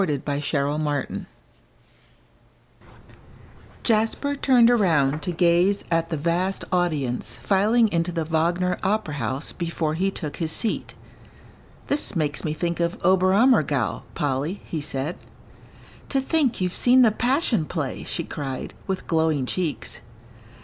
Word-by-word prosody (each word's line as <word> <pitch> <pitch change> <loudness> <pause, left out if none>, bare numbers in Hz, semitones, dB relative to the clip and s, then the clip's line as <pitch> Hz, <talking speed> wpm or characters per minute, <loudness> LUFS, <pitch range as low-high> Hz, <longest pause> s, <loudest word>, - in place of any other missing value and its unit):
XVIII 150 -7 +1
BAYREUTH 145 +2 -3
AND 140 0 +2
OLD 150 +2 -1 0.2
FRIENDS - - -7 2.6
Jasper 225 +6 +1
turned 245 -4 +5
around 155 - +2
to 180 - -2
gaze 175 +4 +3
at 165 0 +1
the 160 - -2
vast 175 +5 -1
audience 155 -9 -1
filing 215 +4 +3
into 170 -1 0
the 165 -2 -2
Wagner 170 +3 0
Opera 200 -5 0
House 140 0 -3
before 170 -3 -2
he 185 +5 0
took 155 -6 -5
his 160 -2 -1
seat. 225 - -1 0.9
"This 285 -7 0
makes 150 -3 -1
me 155 - -1
think 170 +1 -2
of 170 0 -1
Oberammergau, 185 - +3
Polly," 145 +7 -2
he 160 - -4
said. 145 +2 -4 0.9
"To 275 - +1
think 270 -2 +1
you've 180 -1 -1
seen 250 +1 +5
the 225 - +5
Passion 245 - +1
Play," 150 -5 -4
she 170 - -3
cried, 135 -4 -5
with 190 -1 -3
glowing 160 -4 +1
cheeks. 165 +2 -3
170 Hz, 135 wpm, -24 LUFS, 150-200 Hz, 2.6 s, turned